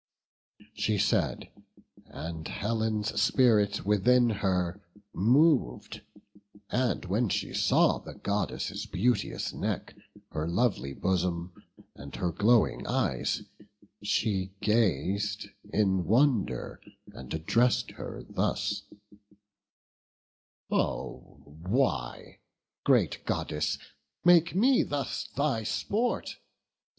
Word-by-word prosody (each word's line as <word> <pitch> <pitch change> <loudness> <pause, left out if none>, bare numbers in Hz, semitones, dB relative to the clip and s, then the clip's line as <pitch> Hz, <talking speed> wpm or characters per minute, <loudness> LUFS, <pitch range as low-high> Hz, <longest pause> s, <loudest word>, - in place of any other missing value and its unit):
She 105 0 0
said, 95 - 0 0.6
and 80 0 -6
Helen's 110 0 -1
spirit 105 -7 +3
within 120 +4 +4
her 95 -2 -1 0.3
mov'd; 125 - +2 0.7
And 125 -5 0
when 105 +5 0
she - - -2
saw - - +3
the - - -10
Goddess' 100 0 -3
beauteous 120 +7 0
neck, - - -3 0.4
Her 75 +1 -2
lovely 85 - 0
bosom, 90 -1 -1 0.4
and 70 +1 -10
her 90 -2 -1
glowing 110 +6 +2
eyes, - - 0 0.6
She 100 -2 -1
gaz'd 105 -1 0 0.2
in 95 -4 +2
wonder, 115 - +1 0.3
and 65 - -10
address'd 115 +10 +1
her - - -8
thus: - - -1 1.9
"Oh - - -3
why, 80 - -2 0.4
great - - +2
Goddess, 75 0 -1 0.5
make 170 -1 +5
me 250 +6 +4
thus 145 -1 -3
thy 140 -5 +1
sport? 215 - -1
105 Hz, 90 wpm, -29 LUFS, 90-120 Hz, 1.9 s, make